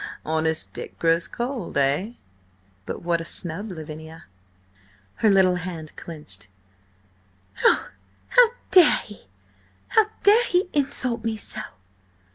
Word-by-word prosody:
"Honest 160 0 -1
Dick - - -8
grows 165 0 +2
cold, 245 - -4
eh? 145 +11 +1 0.7
But - - -6
what 170 -1 0
a - - -5
snub, 175 +5 -4
Lavinia!" 160 -1 -9 0.9
Her 220 - +3
little 190 -2 +4
hand 165 -3 -7
clenched. 110 - -9 1.2
"Oh, - - +3 0.4
how - - +6 0.2
dare 360 -4 +8
he! 205 - -13 0.6
How 440 -1 +4 0.2
dare 440 +4 +6
he 360 0 +1
insult 265 -5 0
me 225 -1 -1
so?" - - -3
180 Hz, 115 wpm, -24 LUFS, 160-245 Hz, 1.2 s, dare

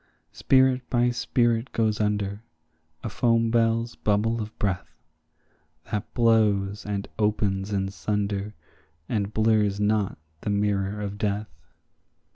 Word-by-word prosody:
Spirit 130 -1 +3
by 120 0 +2
spirit 120 0 +1
goes 110 -1 +1
under, 105 -1 -1 0.6
a - - -2
foam 115 +1 +2
bell's 115 0 +1
bubble 110 +2 +1
of 110 +1 -7
breath, 95 -3 -2 1.0
That 105 -2 -3
blows 105 -4 +2
and 100 -1 -3
opens 105 -2 0
in 95 -1 0
sunder 100 +2 -2 0.5
and 105 -3 -1
blurs 110 -2 +2
not 105 -1 +1 0.2
the - - -3
mirror 100 0 0
of 100 0 -5
death. 105 -2 -1
105 Hz, 115 wpm, -26 LUFS, 100-115 Hz, 1.0 s, Spirit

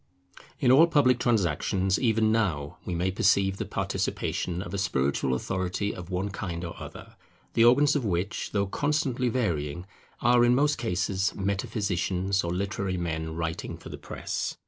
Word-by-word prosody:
In 125 - +4
all 155 +6 +7
public 130 -6 +3
transactions 95 - +1
even 110 -3 +2
now 85 -11 -1
we 90 - -3
may 90 +2 0
perceive 95 0 +2
the - - -3
participation 90 +1 -2
of - - -8
a 100 - -1
spiritual 70 -7 0
authority 95 +7 -2
of 90 -1 -9
one 95 +2 -2
kind 90 -3 -4
or 85 - -6
other; - - -10 0.4
the 115 - +5
organs 140 +5 +5
of 145 - 0
which, 95 -1 -2
though 100 -1 +1
constantly 135 +1 0
varying, 90 - -1 0.3
are 120 0 +4
in 120 0 +5
most 145 0 +2
cases 100 -2 0
metaphysicians 95 -1 -1
or 85 - -2
literary 95 0 -2
men 80 -2 -3
writing 80 -1 -4
for - - -11
the - - -7
press. - - -4
95 Hz, 160 wpm, -27 LUFS, 90-115 Hz, 0.4 s, all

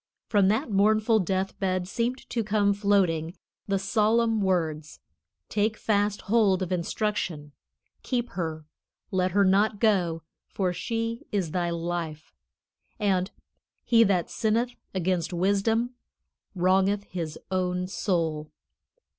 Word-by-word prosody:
From 200 -3 +4
that 215 +2 +1
mournful 215 +2 +3
death 190 +1 -2
bed 185 -2 -1
seemed 240 +6 -2
to 230 - 0
come 205 -1 +2
floating 190 -5 +1 0.3
the 200 -1 +1
solemn 220 +3 +2
words, 160 -5 -1 0.5
"Take 215 +1 0
fast 205 -1 0
hold 200 -4 +2
of 180 - -5
instruction; 175 -4 -2 0.5
keep 245 -2 -2
her; 160 -3 -4 0.5
let 185 -1 +1
her 200 0 +4
not 200 +2 +3
go, 180 -7 +2 0.2
for 185 -2 -1
she 230 +6 -3
is 190 -6 -1
thy 175 0 0
life," 170 -2 -4 0.7
and 190 -3 +1 0.5
"He 230 -1 +5
that 185 -4 +1
sinneth 230 +3 0 0.2
against 180 -1 0
wisdom 205 +7 +1 0.6
wrongeth 190 +3 +2
his 165 -6 -5
own 180 -1 0
soul." 165 -5 -1
195 Hz, 120 wpm, -27 LUFS, 175-215 Hz, 0.7 s, He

